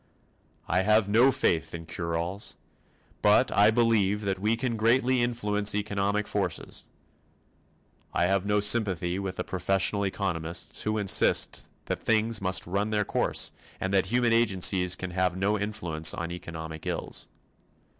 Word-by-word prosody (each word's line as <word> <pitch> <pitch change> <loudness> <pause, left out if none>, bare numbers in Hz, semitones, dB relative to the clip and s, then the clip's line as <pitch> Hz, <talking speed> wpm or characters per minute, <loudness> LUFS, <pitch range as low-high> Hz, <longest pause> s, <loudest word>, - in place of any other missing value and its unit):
I 90 - +1
have 105 +1 +3
no 120 +6 +4
faith 85 -10 0
in 85 0 -8
"cure 85 0 -3
alls" 90 +5 -3 0.7
but - - +4
I 105 +1 +6
believe 110 -3 +2
that 95 -2 -2
we 110 +3 0
can 120 -1 -2
greatly 120 +3 +2
influence 105 -4 0
economic 105 0 -1
forces. - - -3 1.3
I - - 0
have 95 +1 +1
no 105 0 +1
sympathy 95 -4 +2
with 95 -1 -4
the - - -3
professional 95 +2 0
economists 90 -4 -3
who 105 0 -1
insist 100 -3 +2 0.2
that - - -3
things 110 -1 +1
must 95 -1 +1
run 100 +4 -1
their 105 -1 0
course - - 0 0.3
and 95 +1 -3
that 95 -1 +2
human 120 +2 +2
agencies 95 -5 +3
can 95 0 -6
have 90 0 0
no 100 +2 0
influence 85 -7 -1
on 85 0 -5
economic 80 -2 -8
ills. - - -3
100 Hz, 145 wpm, -27 LUFS, 90-110 Hz, 1.3 s, I